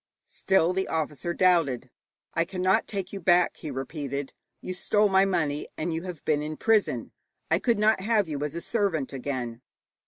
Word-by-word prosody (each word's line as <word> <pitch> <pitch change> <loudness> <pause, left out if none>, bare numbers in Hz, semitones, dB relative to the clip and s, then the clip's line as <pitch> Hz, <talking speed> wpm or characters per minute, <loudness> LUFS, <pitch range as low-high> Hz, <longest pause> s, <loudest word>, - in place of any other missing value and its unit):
Still 180 -2 +2
the 190 +1 -1
officer 155 0 -2
doubted. 165 -9 +2 0.4
'I 165 - +1
cannot 185 +1 +1
take 195 -2 -4
you 200 - -4
back,' 175 0 +3
he 155 - -7
repeated. 140 0 -4 0.3
'You 185 - -5
stole 205 +3 +2
my 190 0 +5
money, 155 -6 -1
and 165 +1 -2
you 160 - -2
have 180 -5 -7
been 150 -1 +2
in 155 0 -4
prison. 220 -2 +1 0.4
I - - +4
could 235 -3 +2
not 210 -1 +3
have 210 -2 +2
you 145 -2 -3
as 150 +1 -3
a 170 - -3
servant 190 - -1
again.' 125 -3 -4
170 Hz, 180 wpm, -27 LUFS, 145-190 Hz, 0.4 s, my